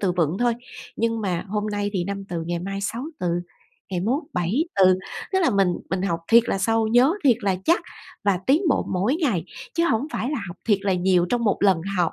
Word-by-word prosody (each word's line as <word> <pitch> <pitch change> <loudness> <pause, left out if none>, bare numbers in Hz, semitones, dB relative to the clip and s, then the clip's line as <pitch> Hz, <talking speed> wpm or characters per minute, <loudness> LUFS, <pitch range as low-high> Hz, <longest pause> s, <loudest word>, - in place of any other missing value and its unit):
từ 185 -3 +1
vựng 170 0 0
thôi. 240 -1 +2 0.4
Nhưng 230 0 0
mà 180 -4 -2
hôm 210 +1 -2
nay 205 -1 -2
thì 185 -4 -1
5 200 0 -4
từ 170 -2 -3
ngày 175 0 -2
mai 195 +3 -4
6 230 +6 -3 0.2
từ, 180 - -1 0.6
ngày 180 -2 -1
mốt 250 - 0
7 180 - 0
từ, 185 -1 +5 0.3
tức 380 - +3
là 340 - +3
mình 195 -2 +3 0.2
mình 185 -1 -1
học 170 -4 -1
thiệt 235 +1 +7
là 195 - 0
sâu, 225 +3 +1
nhớ 245 +8 +4
thiệt 245 -5 +5
là 195 -3 +1
chắc 340 - +3 0.4
và 200 -3 +2
tiến 300 +8 +4
bộ - - +1
mỗi 200 +10 +1
ngày, 245 - 0 0.3
chứ 335 0 +2
hổng 225 +6 +1
phải 245 - -2
là 300 - -1
học 175 - -8
thiệt 205 -3 +4
là 195 -2 +1
nhiều 180 -1 +2
trong 240 -1 +1
một 205 - +2
lần 190 -5 +4 0.2
học, 175 -2 +1
200 Hz, 235 wpm, -23 LUFS, 180-235 Hz, 0.6 s, thiệt